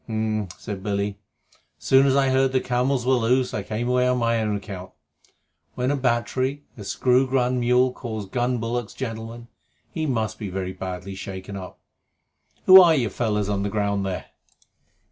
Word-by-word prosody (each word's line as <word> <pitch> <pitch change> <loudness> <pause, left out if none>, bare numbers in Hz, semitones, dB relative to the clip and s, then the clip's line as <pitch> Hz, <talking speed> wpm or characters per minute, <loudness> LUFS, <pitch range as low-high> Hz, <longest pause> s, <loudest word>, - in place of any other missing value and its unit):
"H'm!" 110 -2 -1
said 100 -2 -6
Billy. 100 0 -2 0.6
"As 75 - -22
soon 135 +1 +5
as 135 - +3
I 135 -1 +3
heard 130 0 +2
the 130 - +3
camels 125 0 0
were 130 - +3
loose 125 +1 +2
I 105 - -2
came 110 +4 -3
away 125 0 +2
on 125 0 +2
my 115 -1 +1
own 105 -1 0
account. 95 -3 -7 0.9
When 125 +2 0
a - - +1
battery 130 +2 -1
a 105 - -9
screw 125 +5 +2
gun 125 -1 +1
mule 125 +1 +3
calls 110 -5 -5
gun 120 +5 -1
bullocks 115 0 -3
gentlemen, 115 -1 -6 0.4
he 160 -2 -2
must 110 -5 -2
be 105 -3 -4
very 95 0 -4
badly 95 0 -6
shaken 95 +1 -7
up. 95 -2 -8 0.9
Who 190 0 +11
are 170 -3 +6
you 120 -6 +1
fellows 105 -1 -1
on 100 -1 -1
the 100 - -1
ground 100 -1 0
there?" 95 -2 -3
115 Hz, 180 wpm, -24 LUFS, 100-125 Hz, 0.9 s, Who